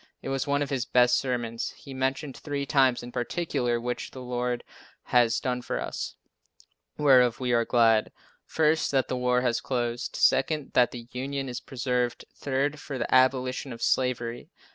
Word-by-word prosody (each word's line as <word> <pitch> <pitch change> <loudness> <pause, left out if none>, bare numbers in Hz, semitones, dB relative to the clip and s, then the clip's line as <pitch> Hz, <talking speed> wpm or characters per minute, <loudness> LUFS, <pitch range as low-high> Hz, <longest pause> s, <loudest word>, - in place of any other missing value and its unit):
It - - -4
was 135 +1 -1
one 145 0 +1
of 145 - -6
his 130 -3 0
best 125 0 +4
sermons. 120 -3 -3
He 140 -3 -11
mentioned 135 +2 -2
three 145 -2 -4
things 135 -4 +3
in 120 - -8
particular 125 -2 -1
which 120 +1 -4
the 130 - -10
Lord 125 0 -2 0.4
has 120 -2 +3
done 125 -1 -2
for - - -3
us, - - -4 0.8
whereof 125 -5 +5
we 125 -2 0
are 115 -1 +3
glad: 115 -3 +3 0.3
First, 160 0 +1
that 135 -2 +1
the - - -1
war 125 0 +1
has 120 -2 0
closed; 120 -2 -2
second, 145 +2 +2
that 125 -1 +5
the 120 -1 -9
Union 135 +2 -3
is 125 -1 -4
preserved; 125 -1 -2
third, 140 +2 -1
for 140 -2 -6
the 120 - -2
abolition 130 0 +2
of 115 0 -7
slavery. 125 +1 0
125 Hz, 170 wpm, -27 LUFS, 120-135 Hz, 0.8 s, whereof